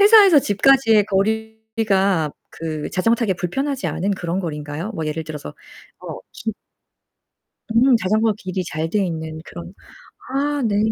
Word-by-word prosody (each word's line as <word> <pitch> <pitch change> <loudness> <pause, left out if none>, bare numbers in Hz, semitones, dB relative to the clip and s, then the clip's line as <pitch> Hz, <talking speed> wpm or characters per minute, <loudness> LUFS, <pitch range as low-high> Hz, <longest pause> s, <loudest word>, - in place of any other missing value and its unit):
회사에서 405 -5 +8
집까지의 225 0 +4
거리가 215 -4 0 0.2
그 155 -2 -5
자전거 225 +5 +2
타기에 215 -5 0
불편하지 270 - -2
않은 200 +3 -1
그런 175 -1 -2
거리인가요? 150 +3 -4
뭐 160 -5 -3
예를 155 +1 -2
들어서 150 - -7 0.5
어 - - -7
진 220 -1 -4 1.2
음 245 +2 +5
자전거 215 +2 +2
길이 185 -2 -4
잘 160 0 -3
돼 205 -1 +1
있는 160 -1 -5
그런 175 +1 -9 0.6
아 285 +1 0
네. 205 -2 +1
200 Hz, 290 characters per minute, -21 LUFS, 165-225 Hz, 1.2 s, 회사에서